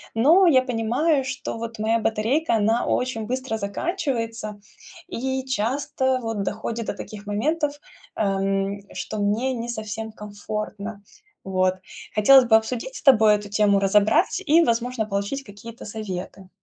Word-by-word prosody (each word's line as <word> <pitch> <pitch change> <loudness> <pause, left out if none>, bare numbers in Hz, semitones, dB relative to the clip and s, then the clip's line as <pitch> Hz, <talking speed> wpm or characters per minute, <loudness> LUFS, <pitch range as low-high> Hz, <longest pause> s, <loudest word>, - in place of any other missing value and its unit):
но 325 +11 +6
я 260 -6 +5
понимаю, 255 +5 +1
что 255 -3 -5
вот 230 0 -6
моя 220 +2 +1
батарейка, 230 +7 +1
она 220 +2 +2
очень 240 -4 -1
быстро 255 -2 -2
заканчивается, 230 - -3 0.5
и 265 +2 -3
часто 260 +2 0
вот 225 -2 -2
доходит 220 +2 -4
до - - -1
таких 210 -1 -9
моментов, 290 +7 -1 0.4
эм, 195 0 0
что 215 - -5
мне 220 +6 0
не 235 0 -5
совсем 220 -1 -5
комфортно. 210 0 -6 0.4
Вот. 185 -1 +1 0.4
Хотелось 255 +5 +7
бы 225 - +5
обсудить 235 - -1
с - - -8
тобой 220 -7 +6
эту 205 0 -6
тему, 205 -1 +3
разобрать 210 - +3
и, 330 +3 +5
возможно, 235 -1 0
получить 200 +7 -3
какие-то 220 +1 -11
советы. 195 -3 -6
225 Hz, 135 wpm, -23 LUFS, 210-260 Hz, 0.5 s, Хотелось